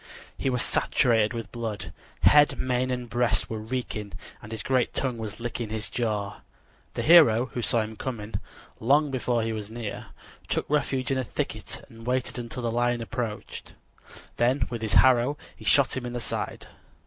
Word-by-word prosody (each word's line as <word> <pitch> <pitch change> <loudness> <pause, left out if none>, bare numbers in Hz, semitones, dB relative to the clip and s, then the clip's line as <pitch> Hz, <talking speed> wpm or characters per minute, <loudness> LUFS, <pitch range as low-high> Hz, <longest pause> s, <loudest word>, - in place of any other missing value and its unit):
He 135 - -1
was 125 -1 +2
saturated 115 -4 +2
with 115 -1 -5
blood: 115 -3 -5 0.3
head, 145 0 +6
mane 130 0 0
and 125 -1 -2
breast 115 -3 +1
were 110 - -3
reeking, 110 -3 -4 0.3
and 105 - -10
his 110 - -4
great 130 -2 +1
tongue 125 -4 -1
was 110 -1 -6
licking 115 -1 -4
his 110 0 -4
jaws. 105 -4 -2 0.6
The - - -1
hero, 140 -8 +6
who 120 - -2
saw 115 0 +2
him 110 0 -5
coming 110 -3 -5 0.5
long 145 +5 +3
before 120 -3 0
he 115 0 -1
was 105 -1 -5
near, 115 -2 -6 0.4
took - - -1
refuge 135 -3 0
in 135 - +1
a - - 0
thicket - - -5
and 115 0 -14
waited 125 0 0
until 120 +1 -5
the 115 - 0
lion 120 +1 +1
approached; 115 -2 -5 0.6
then 125 +1 +2
with 120 -2 -4
his 110 -3 0
arrow 130 +2 +5 0.2
he - - -13
shot 140 -3 +4
him 125 -2 -3
in 120 - -6
the 120 - -2
side. - - -4
120 Hz, 180 wpm, -27 LUFS, 110-130 Hz, 0.6 s, head